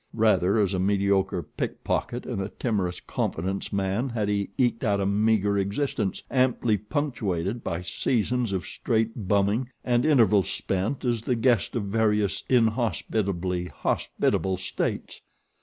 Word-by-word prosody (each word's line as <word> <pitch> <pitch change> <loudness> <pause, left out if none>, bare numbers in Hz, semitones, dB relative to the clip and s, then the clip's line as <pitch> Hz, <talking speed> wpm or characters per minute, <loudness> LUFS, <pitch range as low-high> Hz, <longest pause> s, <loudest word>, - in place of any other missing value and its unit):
Rather 105 -3 +3
as 100 -3 +2
a 95 - 0
mediocre 95 -2 +1
pickpocket 120 +9 -3
and 115 -6 -3
a 95 - -3
timorous 100 -7 -2
confidence 95 +4 -3
man 100 +6 0
had 110 -4 -1
he 100 -1 0
eked 120 -3 +1
out 100 -4 +2
a 100 - 0
meager 105 0 +2
existence, 100 0 -1
amply 125 -4 +2
punctuated 105 - -2
by 85 +2 -3
seasons 120 +4 0
of 95 -2 -2
straight 115 -2 -1
bumming 100 +5 +2 0.2
and 120 -1 +2
intervals 110 - +4
spent 100 +9 -2
as 120 -2 +1
the 125 +2 0
guest 120 -2 +2
of 115 - 0
various 105 -1 +1
inhospitably 100 -6 +1
hospitable 95 +1 -1
states. 95 - -3
105 Hz, 135 wpm, -26 LUFS, 95-120 Hz, 0.2 s, intervals